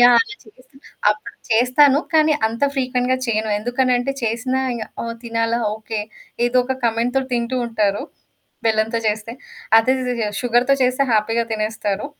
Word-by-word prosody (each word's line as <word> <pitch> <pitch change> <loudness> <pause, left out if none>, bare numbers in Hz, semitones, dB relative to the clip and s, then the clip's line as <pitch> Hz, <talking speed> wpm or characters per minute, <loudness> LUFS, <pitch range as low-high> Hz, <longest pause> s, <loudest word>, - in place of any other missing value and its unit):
Yeah! 245 0 +8
అలా 450 -2 -3
చేసినా 255 +5 -21 0.3
అప్పుడు 210 0 -5 0.2
చేస్తాను. 255 +5 +5
కానీ 310 -1 +4
అంత 230 +4 -5
ఫ్రీక్వెంట్‌గా 255 -1 0
చెయ్యను. 220 -1 0
ఎందుకనంటే 245 +3 0
చేసినా 235 +3 -1
ఇగ 225 - -4 0.2
ఆహ్, 230 0 -4
తినాలా? 230 0 0 0.2
ఓకే. 220 0 -4 0.5
ఏదో 245 +1 0
ఒక 260 +1 -2
కమెంట్‌తో 235 +3 +1
తింటూ 240 +1 -1
ఉంటారు. 210 -1 0 0.6
బెల్లంతో 220 +1 +1
చేస్తే. 215 +2 -3 0.5
అదే 255 +4 +3 0.5
షుగర్‌తో 245 +3 +3
చేస్తే 255 +2 +2
హ్యాపీగా 225 +2 +1
తినేస్తారు. 215 0 -2
235 Hz, 135 wpm, -20 LUFS, 220-255 Hz, 0.6 s, Yeah